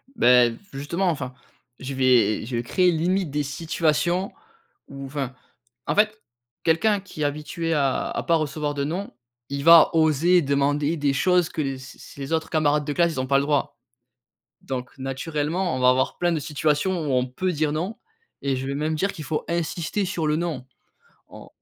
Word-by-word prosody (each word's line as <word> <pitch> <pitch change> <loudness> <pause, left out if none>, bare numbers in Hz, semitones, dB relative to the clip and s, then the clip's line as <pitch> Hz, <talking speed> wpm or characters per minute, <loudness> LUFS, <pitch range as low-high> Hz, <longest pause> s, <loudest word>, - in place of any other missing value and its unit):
Beh, 125 - +5
v - - -10 0.2
justement, 170 +7 -1
enfin, 135 -6 -3 0.5
je 135 +1 -5
vais 125 -5 +3
je 120 +1 -4
vais 120 - -2
créer, 180 +9 +2
limite, 175 0 0
des 150 0 -1
situations 165 +4 0 0.6
où 135 0 -8
enfin 135 -2 -4 0.5
en - - 0
fait, 215 +1 +2 0.4
quelqu'un 200 +6 +2
qui 185 -5 -10
est - - +2
habitué 150 +3 -2
à 140 -3 0
à - - -3
pas 170 - +2
recevoir 150 -1 -2
de 140 - -1
«non», 180 +6 -4 0.4
il 140 0 -3
va 165 0 +8
oser 165 +3 +4
demander 145 +2 +1
des 145 -1 +1
choses 180 +4 +2
que 155 - -3
les 135 -2 -2
c'est 130 +1 -12
c'est 140 - -12
les 135 +4 -4
autres 160 0 -1
camarades 150 -2 +1
de 145 - -2
classe, 170 +1 +2
ils 135 - -4
ont 130 - -4
pas 135 +1 +3
le - - 0
droit. 145 -4 -1 0.8
Donc 125 0 -6
naturellement, 150 +5 -2
on - - -3
va 125 0 +6
avoir 130 +1 0
plein 175 -1 +1
de 160 - -1
situations 150 +3 0 0.2
où - - 0
on 125 0 +2
peut 180 +9 -2
dire 150 -2 0
«non» 180 +8 -3 0.4
et 140 -1 0
je 130 +1 -4
vais 140 - -3
même 155 +2 -1
dire 195 +5 0
qu'il 155 - -8
faut 150 +3 -2
insister 170 +3 -2
sur 180 -4 -2
le 150 0 +2
«non». 160 -7 -3 0.6
On - - -12
150 Hz, 195 wpm, -24 LUFS, 135-170 Hz, 0.8 s, va